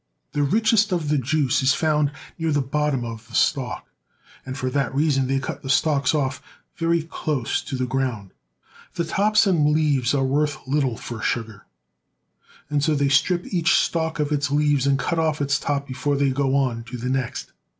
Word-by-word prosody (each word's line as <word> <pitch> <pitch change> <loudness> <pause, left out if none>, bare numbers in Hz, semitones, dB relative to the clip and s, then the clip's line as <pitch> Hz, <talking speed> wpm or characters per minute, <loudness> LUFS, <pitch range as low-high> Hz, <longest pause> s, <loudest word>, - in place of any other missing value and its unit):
The 145 - -1
richest 215 +7 +3
of 165 -5 -1
the 150 -1 +2
juice 140 0 +1
is 130 0 +3
found 150 -2 +1 0.3
near 165 -1 0
the 145 - +2
bottom 140 -1 -1
of 115 0 -8
the 115 - -10
stalk, 135 -5 0 0.6
and 130 +1 -5
for 130 - -2
that 135 -1 -1
reason 140 -3 +2
they 135 +1 +1
cut 145 +1 -5
the 135 - -7
stalks 140 0 +2
off 140 -2 -1 0.3
very 165 -1 +1
close 150 -6 -2
to 135 - -5
the 130 0 -1
ground. 125 -6 -2 0.6
The 170 - -1
tops 210 +6 +3
and 165 -7 +3
leaves 145 -4 +2
are 135 - +1
worth 145 +2 0
little 135 -4 0
for 115 -2 -7
sugar, 110 -4 -3 1.0
and 145 -1 0
so 155 0 +2
they 140 -1 +1
strip 175 +6 +2
each 175 +1 +3
stalk 160 -1 0
of 150 0 0
its 145 -1 0
leaves 145 -1 +2
and 140 -1 +3
cut 165 +5 -1
off 155 -2 0
its 140 -1 +1
top 140 -1 -2
before 135 +2 -1
they 140 -1 +2
go 135 0 0
on 125 -4 0
to 125 +1 -7
the 120 +1 -4
next. 130 -2 -3
140 Hz, 190 wpm, -23 LUFS, 130-155 Hz, 1.0 s, richest